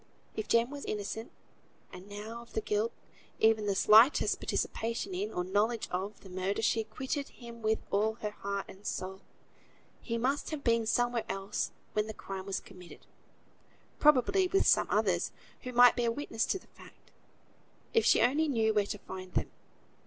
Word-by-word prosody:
If 215 - -3
Jem 235 +3 +3
was 285 -1 -7
innocent 215 +2 -4 0.6
(and 185 +2 -11
now, 215 +3 -7
of 235 - -16
his 220 - -1
guilt, 210 +2 0 0.5
even 220 -1 +3
his 195 -1 +1
slightest 225 +9 +6
participation 230 - -2
in, 395 +4 -2
or 180 - -2
knowledge 210 +5 0
of, 195 +3 -4
the 190 - -13
murder, 190 +4 -2
she 225 - +2
acquitted 260 +6 -4
him 235 -1 -11
with 220 0 +2
all 215 +2 +2
her 210 -2 -4
heart 200 -1 -4
and 190 +2 -13
soul), 190 -1 -4 0.8
he 230 - -2
must 265 +5 0
have 305 -3 -5
been 230 -2 +2
somewhere 240 0 +1
else 195 0 -2 0.2
when 210 0 0
the 220 - -6
crime 195 0 -7
was 195 - -1
committed; 180 -3 -14 0.9
probably 300 +7 +4
with 390 +2 +2
some - - +4
others, - - +1 0.3
who 250 - -6
might 245 0 +7
bear 235 -1 +1
witness 230 -3 -2
to - - 0
the - - -16
fact, - - -18 0.8
if 455 - +4
she - - +5
only 290 +6 +3
knew 225 -6 +2
where 205 -1 +2
to 205 - -4
find 185 -2 -9
them. - - 0
220 Hz, 175 wpm, -31 LUFS, 205-245 Hz, 0.9 s, might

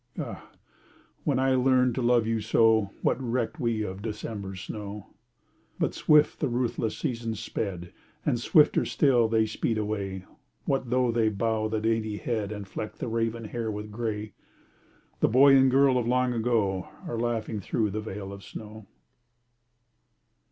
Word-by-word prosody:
Ah! - - -6 0.8
when - - +2
I 130 0 +2
learned 130 -1 +3
to 130 - -2
love 120 -1 +3
you 115 0 0
so 110 -1 +3
What 135 - +1
recked 125 +3 -2
we 115 -4 0
of 95 -1 -6
December's 105 -3 -5
snow? 105 0 -7 0.6
But - - 0
swift 150 -1 +4
the 145 - 0
ruthless 120 -2 -1
seasons 115 -6 -3
sped 90 -6 -4 0.3
And - - +1
swifter - - +4
still 125 -5 +3
they 110 0 +2
speed 110 +1 -1
away. 100 -3 -3 0.4
What 135 -3 -1
though 125 0 +2
they 115 -1 +2
bow 110 +1 0
the 110 0 -1
dainty 110 -1 0
head 110 -3 -2
And 105 -2 -6
fleck 105 +2 -6
the - - -4
raven 115 0 -1
hair 115 +1 -3
with 105 0 -5
gray? 105 -2 -4 0.9
The - - +4
boy 135 +4 +7
and 135 0 +6
girl 135 -1 +4
of 120 - -2
long 125 0 +2
ago 110 -5 0 0.2
Are 115 - -3
laughing 115 -2 -2
through 105 +2 -1
the 110 +2 -3
veil 100 -2 -6
of 100 0 -10
snow. 110 -1 -10
110 Hz, 160 wpm, -27 LUFS, 105-120 Hz, 0.9 s, boy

